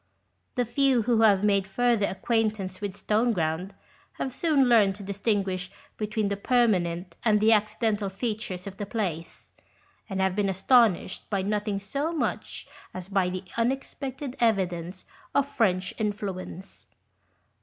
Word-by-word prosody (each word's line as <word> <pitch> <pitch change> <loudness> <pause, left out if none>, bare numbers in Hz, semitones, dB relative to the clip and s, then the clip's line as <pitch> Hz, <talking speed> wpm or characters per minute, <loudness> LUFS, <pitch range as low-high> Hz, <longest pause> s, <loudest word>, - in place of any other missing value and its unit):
The 245 -1 +1
few 255 0 +2
who 230 0 +2
have 205 -3 +5
made 200 -2 +2
further 230 0 +2
acquaintance 210 -2 -1
with 200 -2 -3
Stoneground 195 -5 0 0.4
have 260 - -4
soon 285 -3 +3
learned 210 -5 +5
to 205 - -9
distinguish 195 -2 -1 0.3
between 215 -1 -1
the 200 - -2
permanent 185 -7 +1
and 215 -2 +4
the 215 +2 +4
accidental 215 -1 +1
features 200 -3 -4
of 195 -1 -8
the 205 - -4
place, 175 -8 -4 0.6
and 195 -1 -3
have 190 -1 +1
been 200 -1 +1
astonished 195 -1 +2
by 200 -3 0
nothing 210 0 -1
so 280 +11 -2
much 325 -3 -3 0.3
as 185 0 -6
by 195 -2 +2
86 180 +1 -2
OHOST 185 - -9
TALES. - - -17
the - - +2
unexpected 265 +1 -3
evidence 185 -5 0 0.3
of 280 0 +3
French 185 -8 +1
influence. 195 -3 -4
205 Hz, 145 wpm, -27 LUFS, 190-230 Hz, 0.6 s, have